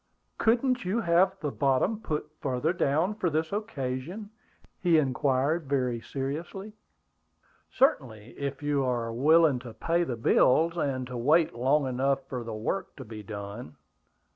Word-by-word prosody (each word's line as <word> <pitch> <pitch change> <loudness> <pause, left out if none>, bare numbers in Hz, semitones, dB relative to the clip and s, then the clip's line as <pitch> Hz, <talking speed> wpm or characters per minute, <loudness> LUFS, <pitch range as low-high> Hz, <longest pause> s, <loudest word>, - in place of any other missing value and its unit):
"Couldn't 245 +2 +2
you 190 +6 0
have 185 +1 +3
the 150 -3 -2
bottom 140 - +1
put 150 -8 -3
farther 135 +5 0
down 165 +5 +1
for 210 -5 -1
this 160 +1 -1
occasion?" 190 - -4 0.5
he 175 -3 +4
inquired 140 +2 +1
very 125 -4 0
seriously. 160 - -5 1.0
"Certainly, 120 - 0
if 140 0 -5
you 145 -2 +1
are 120 -3 -1
willing 150 +2 +4
to 120 -3 -10
pay 170 +8 +1
the 125 -8 -3
bills 160 +8 +3
and 135 -6 -1
to 125 0 -7
wait 155 +7 +3
long 135 +5 +2
enough 135 +1 0
for 125 -2 -4
the 115 - -6
work 170 - -3
to 130 - -9
be 110 -1 -8
done." 100 -4 -8
140 Hz, 145 wpm, -28 LUFS, 125-170 Hz, 1.0 s, he